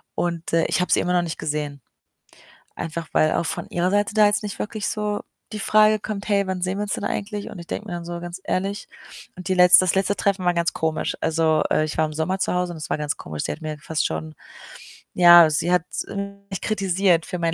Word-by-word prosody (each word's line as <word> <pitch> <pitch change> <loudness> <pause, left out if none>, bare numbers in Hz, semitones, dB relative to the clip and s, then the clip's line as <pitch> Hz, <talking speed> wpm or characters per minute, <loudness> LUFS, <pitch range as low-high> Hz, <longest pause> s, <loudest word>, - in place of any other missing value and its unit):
und, 170 -1 -3
äh, 165 - +4
ich - - 0
habe 180 - -2
sie - - +3
immer 180 - -1
noch 175 -1 +2
nicht 165 - -5
gesehen. 145 -2 -3 1.0
Einfach 165 0 -5
weil 155 - +3
auch 165 - 0
von - - -4
ihrer 175 +1 0
Seite 205 +1 +1
da 215 -1 +6
jetzt 205 +1 +1
nicht 205 - -5
wirklich 210 -1 -3
so 210 -1 -2 0.3
die 215 - -4
Frage 215 +1 +4
kommt: 210 -1 -5
„Hey, 200 -1 +2
wann 185 -1 -3
sehen 185 +2 -1
wir - - -1
uns 205 - -4
denn - - -5
eigentlich?“ 205 0 -3
Und 195 - -10
ich 170 - -9
denke 210 - -5
mir 175 - -4
dann 170 -1 -5
so: 170 0 -5
„Ganz 175 +2 -7
ehrlich” 195 +2 -2 0.5
Und 185 +1 -7
die 185 - +2
letzte 180 0 +8
das 185 - +1
letzte 195 +1 +1
Treffen 195 -2 0
war 175 - +3
ganz 170 0 0
komisch. 160 -1 -2
Also, 160 -1 +2
äh, - - +3
ich 155 - -5
war 160 - +4
im 155 - -7
Sommer 185 +5 -1
zu - - 0
Hause 180 -1 -1
und - - -8
es 155 - -7
war - - 0
ganz 150 -1 -2
komisch. 75 -1 -6
Sie - - -5
hat 160 - -9
mir 155 -1 -5
fast 155 0 -1
schon 80 0 -5 0.8
ja, 175 -2 +8
sie 160 +3 0
hat 180 -1 +2 0.7
mich 190 - -4
kritisiert 190 -4 +1
für 180 - -4
meinen 165 -1 0
180 Hz, 245 wpm, -23 LUFS, 160-200 Hz, 1.0 s, letzte